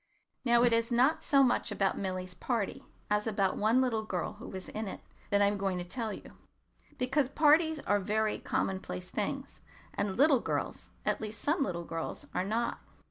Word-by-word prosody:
Now 240 Hz, -1 st, +4 dB
it 240 Hz, -1 st, +4 dB
is 230 Hz, +1 st, +1 dB
not 260 Hz, +7 st, +4 dB
so 275 Hz, -1 st, +4 dB
much 245 Hz, -3 st, +2 dB
about 195 Hz, -2 st, +1 dB
Milly's 185 Hz, -1 st, -3 dB
party 230 Hz, 0 st, -2 dB, 0.3 s
as 210 Hz, +1 st, +1 dB
about 200 Hz, -3 st, +1 dB
one 225 Hz, +5 st, +3 dB
little 230 Hz, -4 st, 0 dB
girl 185 Hz, -5 st, -3 dB
who 210 Hz, -, -10 dB
was 190 Hz, -1 st, -7 dB
in 215 Hz, 0 st, -4 dB
it -, -, -6 dB, 0.3 s
that 205 Hz, 0 st, +4 dB
I -, -, +6 dB
am 200 Hz, 0 st, +1 dB
going 195 Hz, -2 st, 0 dB
to 175 Hz, -, -3 dB
tell 220 Hz, +5 st, -3 dB
you; -, -, -9 dB, 0.7 s
because 260 Hz, +1 st, +1 dB
parties 310 Hz, +2 st, +4 dB
are 205 Hz, -, +2 dB
very 215 Hz, +2 st, 0 dB
commonplace 185 Hz, -, -3 dB
things, -, -, -3 dB, 0.3 s
and 200 Hz, -1 st, -2 dB
little 280 Hz, -1 st, +6 dB
girls, -, -, -3 dB, 0.2 s
at -, -, +1 dB
least 215 Hz, -1 st, -4 dB
some 300 Hz, +2 st, +1 dB
little 175 Hz, -9 st, -1 dB
girls, 165 Hz, -1 st, -4 dB
are 180 Hz, -, 0 dB
not. 225 Hz, +4 st, -1 dB
215 Hz, 190 wpm, -31 LUFS, 195-250 Hz, 0.7 s, I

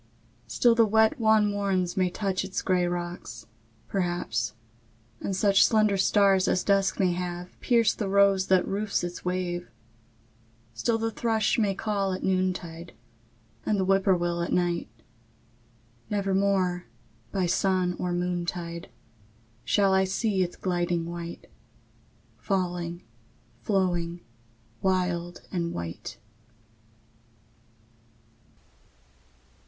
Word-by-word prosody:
III. -, -, -34 dB
Still 240 Hz, -1 st, +3 dB
the 230 Hz, -1 st, +5 dB
wet 220 Hz, +5 st, +3 dB
wan 220 Hz, -1 st, +4 dB
morns 195 Hz, -3 st, 0 dB
may 185 Hz, -1 st, +2 dB
touch 190 Hz, 0 st, -2 dB
Its 190 Hz, 0 st, -4 dB
gray 180 Hz, -2 st, +2 dB
rocks, 175 Hz, -11 st, -5 dB, 0.4 s
perhaps; 175 Hz, -, -2 dB, 0.6 s
and 195 Hz, -, -3 dB
such 195 Hz, 0 st, +4 dB
Slender 215 Hz, -3 st, +3 dB
stars 195 Hz, 0 st, +3 dB
as 185 Hz, -, +1 dB
dusk 195 Hz, -1 st, +2 dB
may 185 Hz, -2 st, +3 dB
have 175 Hz, 0 st, -4 dB
Pierce 230 Hz, -4 st, +3 dB
the 205 Hz, -3 st, -3 dB
rose 195 Hz, -1 st, +4 dB
that 185 Hz, -1 st, +3 dB
roofs 200 Hz, 0 st, -1 dB
its 175 Hz, 0 st, -5 dB
wave; 180 Hz, -1 st, -2 dB, 1.0 s
Still 225 Hz, -, 0 dB
the 225 Hz, 0 st, -1 dB
thrush 225 Hz, 0 st, +1 dB
may 200 Hz, -3 st, +1 dB
call 200 Hz, -2 st, -1 dB
at 185 Hz, -, -5 dB
noontide, 180 Hz, -3 st, -2 dB, 0.7 s
And 210 Hz, -2 st, 0 dB
the 190 Hz, -, +1 dB
whippoorwill 185 Hz, -3 st, +2 dB
at 170 Hz, -, -2 dB
night; 175 Hz, -1 st, 0 dB, 1.2 s
Nevermore, 195 Hz, -3 st, +1 dB, 0.5 s
by 190 Hz, -2 st, 0 dB
sun 185 Hz, 0 st, +1 dB
or 180 Hz, -, -1 dB
moontide, 175 Hz, -1 st, -3 dB, 0.7 s
Shall 195 Hz, +5 st, +3 dB
I 190 Hz, 0 st, +4 dB
see 195 Hz, +1 st, 0 dB
it 180 Hz, -1 st, -2 dB
gliding 175 Hz, -2 st, 0 dB
white, 170 Hz, 0 st, -7 dB, 0.9 s
Falling, 175 Hz, +2 st, -2 dB, 0.6 s
flowing, 175 Hz, -, 0 dB, 0.6 s
wild 180 Hz, -2 st, -1 dB
and 170 Hz, -2 st, -2 dB
white. 85 Hz, +5 st, -6 dB
185 Hz, 110 wpm, -27 LUFS, 175-200 Hz, 1.2 s, the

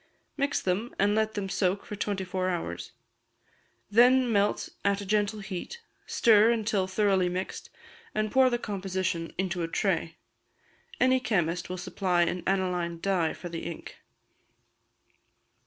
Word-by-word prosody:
Mix 280 Hz, -1 st, 0 dB
them, 195 Hz, +6 st, -2 dB
and 205 Hz, +1 st, +3 dB
let 220 Hz, 0 st, 0 dB
them 200 Hz, -2 st, -2 dB
soak 190 Hz, 0 st, 0 dB
for 210 Hz, -, -6 dB
twenty 200 Hz, -1 st, -2 dB
four 185 Hz, 0 st, -2 dB
hours; 165 Hz, -, -4 dB, 1.0 s
then 250 Hz, +2 st, +5 dB
melt 205 Hz, -1 st, +1 dB
at 200 Hz, 0 st, +2 dB
a 200 Hz, -, -6 dB
gentle 210 Hz, +1 st, 0 dB
heat, 195 Hz, -, -6 dB, 0.3 s
stir 220 Hz, -1 st, +5 dB
until 215 Hz, -4 st, +1 dB
thoroughly 190 Hz, -2 st, +2 dB
mixed, 185 Hz, +2 st, -5 dB, 0.5 s
and 215 Hz, 0 st, 0 dB
pour 260 Hz, -1 st, +5 dB
the 240 Hz, -, 0 dB
composition 185 Hz, -5 st, -3 dB
into 185 Hz, -2 st, -1 dB
a 165 Hz, -, -1 dB
tray. 165 Hz, -2 st, -1 dB, 0.8 s
Any 255 Hz, +1 st, +4 dB
chemist 175 Hz, -8 st, -1 dB
will 185 Hz, -, -4 dB
supply 180 Hz, -1 st, +1 dB
an 180 Hz, +1 st, -1 dB
aniline 180 Hz, -3 st, 0 dB
dye 180 Hz, -4 st, +1 dB
for 175 Hz, -, -8 dB
the 165 Hz, -1 st, -5 dB
ink. 170 Hz, -, -7 dB
195 Hz, 140 wpm, -28 LUFS, 180-215 Hz, 1.0 s, then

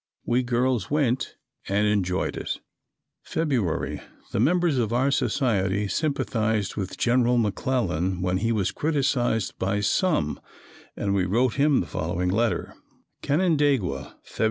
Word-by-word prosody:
We 120 Hz, +1 st, +2 dB
girls 125 Hz, -3 st, 0 dB
went 135 Hz, -3 st, 0 dB, 0.3 s
and 100 Hz, +2 st, +2 dB
enjoyed 95 Hz, -3 st, 0 dB
it. -, -, -4 dB, 0.6 s
February. 130 Hz, -, -1 dB, 0.3 s
The -, -, -1 dB
members 165 Hz, +2 st, +2 dB
of 115 Hz, -2 st, 0 dB
our 130 Hz, +4 st, +2 dB
society 105 Hz, -6 st, +1 dB
sympathized 110 Hz, -, -1 dB
with 95 Hz, -3 st, -4 dB
General 125 Hz, 0 st, +3 dB
McClellan 100 Hz, -5 st, 0 dB
when 90 Hz, 0 st, +1 dB
he 115 Hz, +4 st, 0 dB
was 105 Hz, -5 st, 0 dB
criticised 135 Hz, -8 st, 0 dB
by 100 Hz, +2 st, 0 dB
some 125 Hz, -, +1 dB, 0.6 s
and 100 Hz, -1 st, -1 dB
we 95 Hz, -2 st, +2 dB
wrote 115 Hz, +6 st, +2 dB
him 145 Hz, -1 st, +3 dB
the -, -, -4 dB
following 90 Hz, +2 st, -2 dB
letter: 115 Hz, +5 st, 0 dB, 0.5 s
"Canandaigua, 145 Hz, -, +1 dB
Feb. -, -, -15 dB
115 Hz, 130 wpm, -25 LUFS, 100-135 Hz, 0.6 s, General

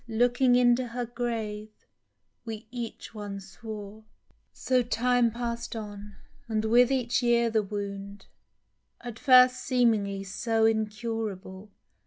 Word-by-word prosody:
Looking 245 Hz, +2 st, +3 dB
into 245 Hz, 0 st, +3 dB
her 240 Hz, +1 st, -4 dB
grave, 225 Hz, -3 st, -4 dB, 0.7 s
we 220 Hz, -2 st, -7 dB
each 240 Hz, -2 st, -7 dB
one 205 Hz, -2 st, -6 dB
swore! 205 Hz, +2 st, -9 dB, 0.5 s
So 255 Hz, -1 st, +1 dB
time 245 Hz, 0 st, +2 dB
pass'd 235 Hz, 0 st, -4 dB
on, 205 Hz, -2 st, -8 dB, 0.3 s
and 220 Hz, -1 st, -1 dB
with 240 Hz, +3 st, +5 dB
each 250 Hz, -2 st, +1 dB
year 235 Hz, -1 st, +2 dB
the 220 Hz, -1 st, +2 dB
wound 200 Hz, -1 st, -6 dB, 0.8 s
(At 240 Hz, -2 st, -8 dB
first 255 Hz, -2 st, +6 dB
seemingly 220 Hz, -6 st, +1 dB
so 220 Hz, +3 st, 0 dB
incurable. 215 Hz, -3 st, -2 dB
225 Hz, 115 wpm, -28 LUFS, 210-240 Hz, 0.8 s, first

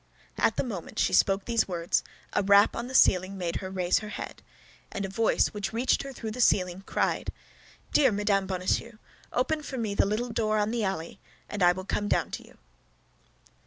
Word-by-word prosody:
At -, -, +3 dB
the -, -, 0 dB
moment 205 Hz, -10 st, -6 dB
she -, -, +2 dB
spoke 195 Hz, 0 st, +3 dB
these 230 Hz, -1 st, +1 dB
words 170 Hz, -2 st, 0 dB, 0.3 s
a -, -, +2 dB
rap 200 Hz, +1 st, +5 dB
on 235 Hz, +1 st, -4 dB
the 260 Hz, -, -6 dB
ceiling 185 Hz, -3 st, +4 dB
made 175 Hz, -2 st, -2 dB
her 190 Hz, -, -5 dB
raise 180 Hz, -2 st, +1 dB
her 210 Hz, -, -8 dB
head, -, -, -7 dB, 0.5 s
and 200 Hz, 0 st, -3 dB
a -, -, -5 dB
voice 220 Hz, +3 st, +2 dB
which 210 Hz, +1 st, -4 dB
reached 240 Hz, +3 st, +2 dB
her 275 Hz, -, -7 dB
through 225 Hz, -4 st, -6 dB
the 250 Hz, +3 st, -3 dB
ceiling 180 Hz, -4 st, +2 dB
cried, -, -, -1 dB, 0.6 s
"Dear 270 Hz, -4 st, +5 dB
Madame 200 Hz, -1 st, +1 dB
Bonacieux, 190 Hz, +4 st, -2 dB, 0.3 s
open 305 Hz, +5 st, 0 dB
for 275 Hz, -3 st, -6 dB
me 220 Hz, -4 st, -2 dB
the 200 Hz, -, +2 dB
little 225 Hz, +4 st, -1 dB
door 215 Hz, -1 st, 0 dB
on 210 Hz, +1 st, +1 dB
the 235 Hz, -2 st, -1 dB
alley, 190 Hz, -1 st, -3 dB, 0.3 s
and 205 Hz, -, -5 dB
I 175 Hz, 0 st, +6 dB
will 185 Hz, +1 st, -7 dB
come 205 Hz, +1 st, -1 dB
down -, -, 0 dB
to -, -, -6 dB
you." -, -, -19 dB
205 Hz, 200 wpm, -28 LUFS, 190-230 Hz, 0.6 s, I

